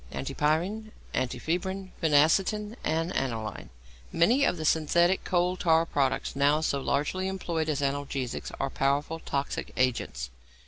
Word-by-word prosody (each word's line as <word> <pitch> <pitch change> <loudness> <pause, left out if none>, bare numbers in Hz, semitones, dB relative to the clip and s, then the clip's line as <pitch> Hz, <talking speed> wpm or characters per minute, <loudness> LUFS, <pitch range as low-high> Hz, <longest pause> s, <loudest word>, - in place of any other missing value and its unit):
ANTIPYRINE, 165 +11 -1 0.2
ANTIFEBRIN, 180 +9 -2
PHENACETIN, 185 +8 +3
AND 165 +3 -1
ANILINE 110 - -3 0.4
Many 230 +12 +3
of 180 - +1
the 155 - -4
synthetical 170 +4 +2
coal 180 0 +2
tar 165 -1 +3
products 140 -5 0
now 145 +2 +3
so 140 -3 0
largely 150 +8 0
employed 170 -4 -2
as 145 -2 0
analgesics 140 -2 -2
are 135 0 -1
powerful 145 +4 0
toxic 140 -3 -3
agents. 65 - -1
155 Hz, 125 wpm, -28 LUFS, 140-180 Hz, 0.4 s, PHENACETIN